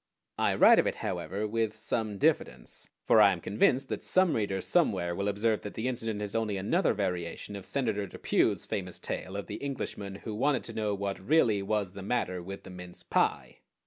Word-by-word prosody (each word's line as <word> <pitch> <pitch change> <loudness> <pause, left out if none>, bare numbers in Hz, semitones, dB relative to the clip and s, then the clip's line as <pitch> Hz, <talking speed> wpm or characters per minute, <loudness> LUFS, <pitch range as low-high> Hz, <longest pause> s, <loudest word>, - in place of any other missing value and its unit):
I - - +2
write - - +7
of - - +2
it, - - -1
however, 100 +6 -2
with 110 0 -1
some 110 -1 -2
diffidence; 60 -9 -1
for 110 - +5
I 100 -1 +7
am 90 - -5
convinced 125 +8 +2
that - - -4
some 185 -3 +3
reader 100 -3 -1
somewhere 85 -2 +1
will 100 +3 -2
observe 105 +2 +1
that 105 - -7
the 110 +3 -2
incident 115 -4 -2
is 100 - -5
only 110 -3 0
another 110 - +1
variation 90 0 -3
of 100 - -8
Senator 110 -7 -1
Depew's - - 0
famous - - -4
tale 95 - -5
of 100 - -4
the - - -6
Englishman 105 -8 -5
who 110 - -4
wanted 135 +5 +1
to 115 - -7
know 105 -2 -1
what 100 0 -3
really 110 - +3
was 100 -1 -1
the 100 +1 -9
matter 95 -4 -1
with 95 +3 -8
the - - -10
mince 90 -1 -10
pie. - - 0
105 Hz, 200 wpm, -30 LUFS, 95-115 Hz, -, write